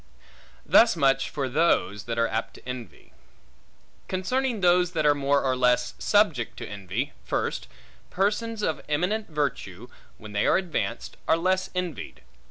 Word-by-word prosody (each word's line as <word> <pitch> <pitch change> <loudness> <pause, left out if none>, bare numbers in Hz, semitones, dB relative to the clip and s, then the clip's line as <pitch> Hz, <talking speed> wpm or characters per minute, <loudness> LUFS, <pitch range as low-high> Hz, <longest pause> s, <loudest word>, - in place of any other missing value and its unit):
Thus 230 -3 +6
much 135 -3 +2
for 140 -3 -2
those, 120 - +1
that 115 -1 -3
are 115 0 +3
apt 110 0 -3
to - - -15
envy. 125 -7 -8 0.9
Concerning 240 +6 -1
those 180 0 +3
that 155 -3 0
are 145 - +6
more 140 0 +1
or 130 -1 +1
less 125 -1 +2
subject 170 - +2
to - - -6
envy: 105 +8 -4
First, 65 0 -2 0.4
persons 210 +3 -1
of 160 - -1
eminent 180 +8 0
virtue, 125 - -3 0.3
when 110 -1 -11
they 105 0 +1
are - - +5
advanced, 185 -4 -3
are 160 - +4
less 185 +2 0
envied. 180 -4 -5
145 Hz, 150 wpm, -26 LUFS, 120-185 Hz, 0.9 s, Thus